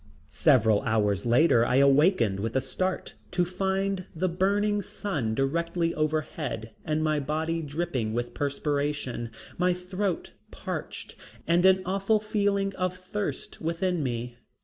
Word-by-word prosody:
Several 110 - +4
hours 105 -1 +1
later 120 -1 +5
I 125 - +1
awakened 140 - +4
with 115 +4 -3
a - - +4
start 180 +8 -3 0.2
to 180 0 +1
find 190 +1 -1
the 185 +3 0
burning 205 +4 +1
sun 145 - -3
directly 165 +5 0
overhead 150 -7 -2
and 155 0 0
my 155 -1 +2
body 160 +3 -1
dripping 150 -7 -2
with 120 +2 -3
perspiration, 145 -4 -2 0.3
my 180 0 +3
throat 185 0 -3 0.2
parched - - -6 0.3
and 175 +3 +4
an 190 0 +4
awful 195 +3 +2
feeling 200 -2 0
of 185 0 -1
thirst 195 +3 -5
within 170 +1 0
me. 120 -2 -3
160 Hz, 130 wpm, -27 LUFS, 130-185 Hz, 0.3 s, later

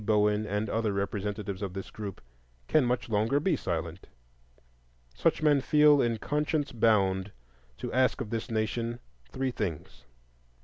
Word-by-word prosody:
Bowen, 105 0 +2
and 105 +2 -1
other 110 0 0
representatives 100 0 -3
of 95 -3 -4
this 95 0 -7
group, 100 -3 -7 0.5
can 155 - +4
much 125 0 0
longer 110 +5 +1
be 165 +2 +1
silent. 85 - -4 1.1
Such - - +1
men 145 -3 +4
feel 150 0 +5
in 115 -1 +1
conscience 150 +3 -1
bound 100 -4 +2 0.5
to - - -5
ask 130 +1 +2
of 105 - -5
this 115 -1 -3
nation 115 +1 -1 0.3
three 130 0 -1
things: 95 -10 -5
1. - - -34
110 Hz, 145 wpm, -29 LUFS, 100-130 Hz, 1.1 s, feel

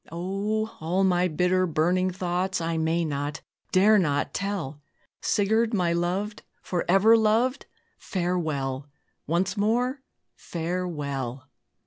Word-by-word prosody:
O! 195 +5 -1
all 175 +5 0
my 180 -1 +3
bitter, 180 +3 +2
burning 175 +4 +1
thoughts 185 +1 -1
I 165 0 -1
may 165 +1 +1
not, 145 0 -3 0.3
dare 210 +3 +5
not 145 -5 0
tell! 175 -8 -3 0.4
Sigurd, 220 +3 +2
my 175 -3 +1
loved 185 +5 -1 0.2
forever 195 +5 +4
loved! 230 +4 +2 0.3
Farewell! 155 -7 -2 0.4
once 180 +4 0
more, 245 +6 +1 0.3
farewell!" 145 -7 -4
180 Hz, 105 wpm, -26 LUFS, 160-200 Hz, 0.4 s, dare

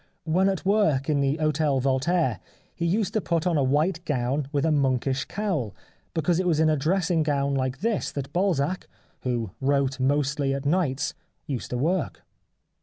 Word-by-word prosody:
When 185 +4 +2
at 190 -2 -3
work 160 -9 +2
at 145 -2 +2
the 140 +2 +1
Hotel 155 -3 +1
Voltaire 135 - +1 0.3
he 170 - -2
used 200 +4 0
to 215 - +1
put 170 -2 -1
on 175 -2 +2
a 145 - +3
white 155 +6 +1
gown 135 -2 -1
with 145 -1 0
a 160 - +2
monkish 135 -2 +1
cowl, 180 - -2 0.4
because 165 +2 +1
it 185 - 0
was 160 -3 +2
in 160 0 +4
a - - +3
dressing 165 +3 +1
gown 140 -2 0
like 130 +1 -1
this 225 0 0
that 140 0 -5
Balzac, 180 -2 0 0.3
who 120 -5 -2
wrote 135 -1 +1
mostly 140 +1 +1
at 140 +1 -5
nights, 150 -2 0 0.3
used 130 -5 -4
to 125 - -2
work. 165 +6 -1
150 Hz, 180 wpm, -25 LUFS, 135-170 Hz, 0.4 s, in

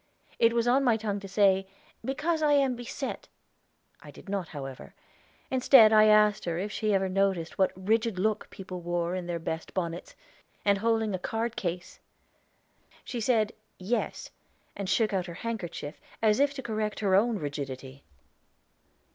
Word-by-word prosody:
It 230 0 +4
was 235 0 +1
on 260 +3 +4
my 240 -4 +3
tongue 210 -2 -3
to 200 - -9
say, 195 -1 +3 0.4
"Because 305 +6 -1
I 300 -1 +4
am 270 -3 +3
beset." 245 +1 -6 0.7
I - - -12
did - - -14
not, 195 -4 -2
however; 135 -3 -8 0.6
instead 250 -4 +7
I 215 0 +7
asked 210 -1 +4
her 170 -1 -2
if 200 +4 -3
she 215 0 -2
never 195 -2 +2
noticed 190 -3 0
what 190 -1 +2
a - - -11
rigid 220 +2 +1
look 215 +3 -1
people 185 -2 -8
wore 175 0 -1
in 180 -1 -4
their 175 -1 -2
best 165 0 -5
bonnets, 170 -2 -4 0.5
and 200 -1 +3
holding 225 -1 +1
a 185 - -2
card 225 +5 -2
case? 175 -1 -4 1.0
She 240 - -5
said, 220 -2 +2 0.2
"Yes," 210 +6 -3 0.4
and 200 -2 -4
shook 220 -2 +2
out 190 -1 -1
her 170 - -7
handkerchief, 180 -9 -5 0.2
as 215 0 +3
if 285 0 +2
to 265 - -6
correct 215 -2 -3
her 195 -3 +1
own 220 +4 +3
rigidity. 140 -3 -6
205 Hz, 165 wpm, -28 LUFS, 180-230 Hz, 1.0 s, instead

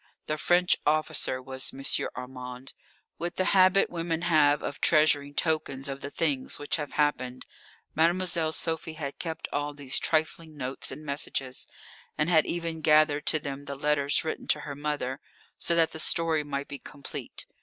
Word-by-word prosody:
The 155 0 -2
French 175 +2 +4
officer 150 -3 +1
was 130 -1 -3
M. 135 - -10 0.3
Armand. 125 0 -8 0.5
With 175 +1 -3
the 185 - 0
habit 185 0 +5
women 165 -1 -2
have 150 -3 +4
of 145 - -5
treasuring 145 -2 +4
tokens 155 -4 -1
of 135 0 -5
the 140 - -4
things 145 -4 -1
which 145 - -1
have 150 -2 -5
happened, 130 -4 0 0.5
Mademoiselle 170 0 +2
Sophie 160 +1 -1
had 140 -3 -6
kept 165 -2 -4
all 145 0 -2
these 140 -2 +1
trifling 160 0 -1
notes 130 0 -5
and 150 +3 -9
messages, 135 -2 -2 0.5
and 150 +2 +1
had 160 -2 +4
even 165 -2 -3
gathered 155 -1 +4
to - - +5
them 140 -1 -6
the 140 - -5
letters 145 0 +2
written 160 - -4
to 150 - +2
her 145 - -6
mother, 145 -2 -3 0.4
so 170 - +2
that 165 -1 +3
the 160 - -5
story 160 -1 +3
might 140 -1 -4
be 140 - -7
complete. 140 -2 -8
150 Hz, 165 wpm, -28 LUFS, 140-160 Hz, 0.5 s, habit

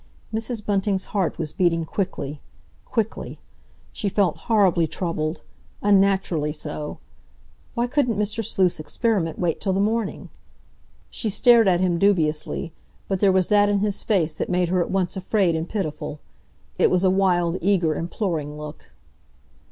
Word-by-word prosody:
Mrs. 220 -1 -3
Bunting's 195 -1 0
heart 195 -5 0
was 155 -3 -4
beating 165 -2 +1
quickly—quickly. 190 - -5 0.6
She 205 - -2
felt 190 -4 +1
horribly 190 -7 +4
troubled, 160 -2 -3 0.4
unnaturally 195 -6 +2
so. 150 0 -6 0.8
Why 235 0 +1
couldn't 245 -4 0
Mr. 210 +2 -1
Sleuth's 185 -4 +1
experiment 170 +1 -1
wait 170 -3 -1
till 195 -2 0
the 190 - 0
morning? 215 0 -1 0.8
She 220 - -3
stared 230 +1 +5
at 180 -1 +3
him 175 -2 +1
dubiously, 155 - +1 0.3
but 195 - -1
there 200 -1 +4
was 185 -1 +2
that 205 0 +4
in 205 - +2
his 205 -1 0
face 170 -8 +1
that - - -4
made 180 -1 +1
her 180 0 +2
at - - -2
once 190 -1 0
afraid 190 -2 +1
and 160 +1 -3
pitiful. 155 -7 -4 0.6
It - - +5
was 180 0 +2
a 185 - +4
wild, 180 -2 +2
eager, 180 -4 +2
imploring 165 -3 -3
look. 150 0 -10
185 Hz, 145 wpm, -23 LUFS, 165-205 Hz, 0.8 s, stared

